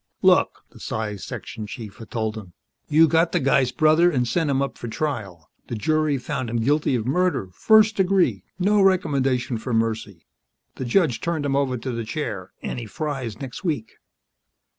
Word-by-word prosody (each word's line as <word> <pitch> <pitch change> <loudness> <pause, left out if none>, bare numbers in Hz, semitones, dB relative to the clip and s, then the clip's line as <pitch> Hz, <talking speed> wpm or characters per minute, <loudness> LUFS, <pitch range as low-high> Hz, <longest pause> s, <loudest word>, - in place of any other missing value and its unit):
"Look," - - +3
the - - -15
Psi 110 -2 -3
Section 105 +3 -7
chief 110 -3 -8
had 115 - -11
told 110 -2 -2
him, 95 -5 -9 0.4
"you 160 +2 +6
got 165 +1 +2
the - - +3
guy's 135 -1 +2
brother 155 +3 +4
and 125 -7 0
sent 155 +6 0
him 135 -1 +1
up 140 0 -2
for 120 - -5
trial. 110 - -4 0.2
The - - -4
jury 155 +5 +1
found 125 -1 -4
him 120 - -4
guilty 140 +4 +2
of 115 -3 -2
murder, 175 - 0
first 220 - +4
degree, 180 - +2
no 200 +2 +3
recommendation 135 -10 +1
for 120 +1 -2
mercy. 110 -5 -2 0.5
The 130 - -4
judge 125 -2 +2
turned 165 -4 -1
him 135 -1 0
over 135 -2 +1
to 125 +3 -4
the 115 -1 -3
chair, 110 - -4
and - - -3
he 115 - -7
fries 130 -4 -4
next 135 +5 -7
week." 145 - -2
130 Hz, 185 wpm, -23 LUFS, 115-155 Hz, 0.5 s, you